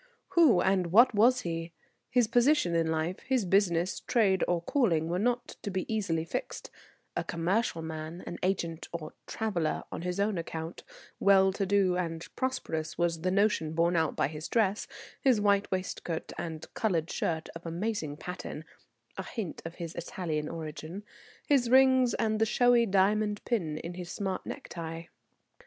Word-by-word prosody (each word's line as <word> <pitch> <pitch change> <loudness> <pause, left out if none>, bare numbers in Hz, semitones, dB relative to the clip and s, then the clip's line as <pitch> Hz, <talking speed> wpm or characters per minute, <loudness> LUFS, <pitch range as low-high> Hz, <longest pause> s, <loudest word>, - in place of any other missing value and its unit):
Who 310 - +5
and 190 -2 +2
what 230 +9 +6
was 245 +4 +4
he? 165 0 -4 0.4
His 245 -1 +4
position 240 - +3
in 165 -1 +2
life, 160 +3 -1
his 255 -5 0
business, 180 -2 +2
trade 195 -6 +2
or 175 -1 +1
calling 170 - +1
were 175 +2 0
not 245 +3 0
to - - -4
be 185 -1 -2
easily 165 -7 0
fixed; 165 - -5 0.4
a - - 0
commercial 170 +1 0
man, 160 +2 -6
an 175 - -6
agent 170 -3 -1
or 165 -2 -6
"traveller" 175 -8 -1
on - - -5
his 180 +2 -3
own 200 -2 +1
account, 165 0 -6 0.4
well 190 -1 +5
to 195 0 -1
do 190 -2 +3
and 165 -2 -3
prosperous, 210 -12 -2
was 170 -1 0
the 185 - +1
notion 190 -5 +2
borne 170 +2 +2
out 160 -2 +1
by - - +2
his 155 +1 -6
dress, 210 -3 +1 0.3
his 255 -5 +4
white 200 -1 +2
waistcoat 185 -3 -3
and 160 -2 -5
coloured 170 -7 0
shirt 160 -1 -2
of 165 - -8
amazing 165 -4 -3
pattern 175 -2 -6 0.5
(a - - -2
hint 215 -9 -5
of 165 +1 -6
his 170 -2 -6
Italian 160 -3 -3
origin), 165 +3 -6 0.4
his 270 -5 +3
rings 260 -2 +5
and 215 -1 0
the 225 - +4
showy 245 0 +4
diamond 205 +2 +2
pin 170 -11 -1
in 170 +2 -6
his 175 -1 -7
smart 190 0 -3
necktie. 165 -1 -6
180 Hz, 165 wpm, -30 LUFS, 165-215 Hz, 0.5 s, what